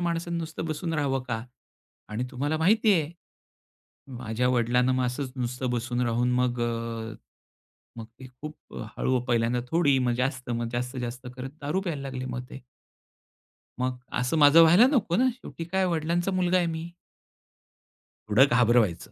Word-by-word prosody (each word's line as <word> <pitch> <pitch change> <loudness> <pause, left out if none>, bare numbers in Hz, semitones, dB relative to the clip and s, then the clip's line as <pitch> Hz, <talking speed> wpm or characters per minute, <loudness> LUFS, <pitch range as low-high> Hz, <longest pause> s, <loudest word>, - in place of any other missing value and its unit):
माणसाने 170 0 -2
नुसतं 160 -1 -5
बसून 160 +1 -3
राहावं 135 -3 0
का 115 -2 -2 0.7
आणि 110 +4 -3
तुम्हाला 145 +4 -1
माहिती 210 +5 +4
आहे, 160 -4 +1 1.1
माझ्या 120 +1 -1
वडिलांना 125 +1 +2
असंच 125 +1 -3
नुसतं 125 0 -3
बसून 120 +1 -2
राहून 120 +1 +1
मग 125 -1 0
अ, 115 -1 -3 0.8
मग 115 - -6
ते 130 - -10
खूप 155 0 -7 0.4
हळू, 130 -1 +1
पहिल्यांदा 120 +1 +1
थोडी, 150 -5 +3
मग 125 -1 +1
जास्त, 125 0 -2
मग 120 0 -2
जास्त, 125 +2 -3
जास्त 125 +1 -5
करत 130 +1 -5
दारू 150 +7 -1
प्यायला 165 -7 -3
लागले 130 -1 -5
मग 125 -1 -4
ते. 135 - -10 1.2
मग, 125 0 -1 0.2
असं 125 +6 0
माझं 150 +2 +8
व्हायला 175 +10 +7
नको 230 - +1
ना. 255 +5 +4
शेवटी 245 -9 -9
काय, 185 +3 0
वडिलांचा 170 +2 0
मुलगा 185 0 +2
आहे 175 - +2
मी. 165 +1 -4 1.4
थोडं 120 +6 +6
घाबरवायचं. 120 -6 +2
130 Hz, 150 wpm, -27 LUFS, 120-165 Hz, 1.4 s, माझं